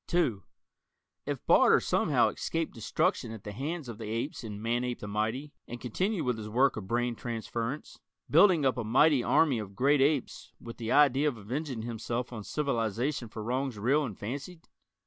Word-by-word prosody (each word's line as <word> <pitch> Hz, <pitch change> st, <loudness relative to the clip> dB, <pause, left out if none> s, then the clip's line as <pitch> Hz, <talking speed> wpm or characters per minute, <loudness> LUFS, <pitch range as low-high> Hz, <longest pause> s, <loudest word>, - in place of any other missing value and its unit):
(2) 130 Hz, -, +1 dB, 0.9 s
If -, -, -4 dB
Barter -, -, +6 dB
somehow -, -, +2 dB
escaped 165 Hz, -1 st, -3 dB
destruction 135 Hz, -, -1 dB
at 110 Hz, -3 st, -9 dB
the 105 Hz, -, -6 dB
hands 145 Hz, -, -4 dB
of 115 Hz, -2 st, -8 dB
the 110 Hz, -2 st, -6 dB
apes 115 Hz, +6 st, -3 dB
in 105 Hz, -2 st, -6 dB
"Manape 120 Hz, +2 st, -1 dB
the 105 Hz, -, -7 dB
Mighty," 110 Hz, +8 st, -2 dB
and 120 Hz, -, -7 dB
continued 180 Hz, -, -1 dB
with 125 Hz, -4 st, -1 dB
his 105 Hz, 0 st, -6 dB
work 130 Hz, +5 st, +3 dB
of 105 Hz, -4 st, -6 dB
brain 120 Hz, +2 st, 0 dB
transference 115 Hz, +4 st, -5 dB, 0.3 s
building 165 Hz, -2 st, +5 dB
up 130 Hz, -1 st, +2 dB
a -, -, -1 dB
mighty 130 Hz, +4 st, +4 dB
army 140 Hz, -8 st, +3 dB
of 100 Hz, -2 st, -7 dB
great 140 Hz, +4 st, +3 dB
apes 140 Hz, -1 st, 0 dB
with 115 Hz, -1 st, -9 dB
the 115 Hz, -1 st, -4 dB
idea 145 Hz, 0 st, +5 dB
of 135 Hz, -6 st, -1 dB
avenging 125 Hz, +3 st, -4 dB
himself 120 Hz, +2 st, -4 dB
on 110 Hz, -3 st, -6 dB
civilization 120 Hz, -1 st, -1 dB
for 110 Hz, 0 st, -7 dB
wrongs 125 Hz, +1 st, -2 dB
real 135 Hz, +9 st, +2 dB
and 115 Hz, -9 st, -5 dB
fancied? 140 Hz, -, -7 dB
125 Hz, 180 wpm, -30 LUFS, 110-145 Hz, 0.9 s, Barter